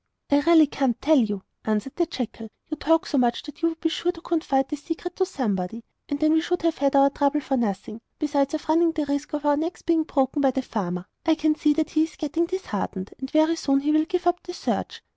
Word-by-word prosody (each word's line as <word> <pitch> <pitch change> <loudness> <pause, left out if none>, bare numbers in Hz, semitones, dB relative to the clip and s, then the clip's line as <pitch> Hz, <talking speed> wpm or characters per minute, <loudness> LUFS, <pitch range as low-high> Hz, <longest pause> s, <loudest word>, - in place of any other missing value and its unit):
'I 285 - +5
really 330 -2 +7
can't 270 -4 -1
tell 310 0 +4
you,' 205 -5 -1 0.2
answered 215 +4 -2
the 345 -1 +1
jackal. 225 -7 -5 0.2
'You 310 - -3
talk 325 +2 +2
so 285 - 0
much 240 -1 +1
that 295 - -11
you 330 - +3
would 325 0 -8
be 325 - +1
sure 350 +2 0
to 330 - -12
confide 280 -6 0
the 300 - -2
secret 330 +4 -6
to 375 - +1
somebody, 225 - -2 0.3
and 285 - -2
then 310 +1 +3
we 320 - +4
should 355 +1 -2
have 330 -1 +1
had 280 0 +2
our 275 0 +6
trouble 285 +1 +1
for 270 -1 -1
nothing, 220 -1 -2 0.2
besides 285 -1 0
running 330 +1 +3
the 310 -2 -1
risk 285 +2 -3
of 295 0 -3
our 290 0 +3
necks 330 +4 -3
being 335 -1 +2
broken 275 -1 0
by 270 - +4
the 265 0 -1
farmer. 180 -6 -3 0.2
I 320 0 +3
can 310 0 +2
see 300 -1 +2
that 310 0 -1
he 310 - +2
is 320 - -13
getting 325 +3 -1
disheartened, 210 - -4
and 265 - -5
very 315 +2 +3
soon 275 -3 +1
he 295 +2 +1
will 310 0 +3
give 360 +1 -2
up 350 0 +2
the 355 - -8
search. - - -3
295 Hz, 245 wpm, -24 LUFS, 265-325 Hz, 0.3 s, really